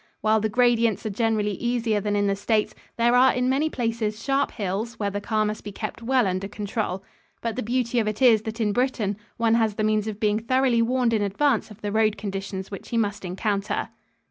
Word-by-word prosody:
While 220 0 +3
the 220 +1 0
gradients 235 -1 +2
are 215 - -1
generally 215 -1 0
easier 230 0 0
than 205 0 -1
in 205 0 +2
the 200 0 +1
States, 210 +2 0 0.2
there 235 +1 +3
are 260 +1 +6
in 250 0 0
many 280 +4 +2
places 225 -4 -2
sharp 275 0 +1
hills 210 +2 -3
where 205 -2 -2
the 205 +1 -3
car 215 0 0
must 210 0 -3
be 205 - -6
kept 215 +3 -6
well 250 0 +2
under 185 +1 -1
control. 205 -2 -3 0.4
But 230 -1 -3
the 255 - -2
beauty 245 +1 0
of 220 - 0
it 215 -1 -2
is 235 -5 +6
that 220 +1 -6
in 210 -2 +1
Britain 235 -4 0 0.2
one 230 -1 +2
has 225 -3 +2
the 215 - -1
means 215 0 +1
of 215 -1 -5
being 210 0 +2
thoroughly 250 0 +2
warned 245 0 +1
in 215 - +2
advance 220 +5 +1
of 210 +1 -14
the 205 - -3
road 215 0 +2
conditions 195 -1 -5
which 195 - -8
he 235 - -1
must 205 -2 -1
encounter. 195 +2 -2
220 Hz, 220 wpm, -25 LUFS, 205-235 Hz, 0.4 s, are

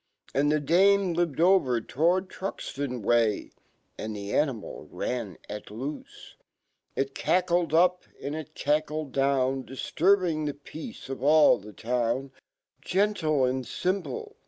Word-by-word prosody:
Andfhe 145 +1 +2
dame 195 +3 +4
lived 165 -4 -1
over 170 -9 +4
towardTruxtonway, 135 - 0 0.5
Andihe 105 -2 -5
animal 135 -8 -1
ran. 115 -9 -4
at 105 0 -7
loofc. 130 +8 -5 0.9
It 135 0 -1
cackled 175 -1 +1
up 180 +3 +3
and 140 - -4
it 155 -3 -7
cackled 150 0 -1
down, 135 -1 +1
DfHurblng 165 +4 +1
fhe 145 0 -9
peace 160 +9 -8
of 135 -1 -6
all 150 -4 +5
fhc 105 0 -12
town; 125 +3 -1 0.5
Gentle 180 -8 +1
and 130 +1 -1
fimple 200 - -3
145 Hz, 110 wpm, -27 LUFS, 130-175 Hz, 0.9 s, all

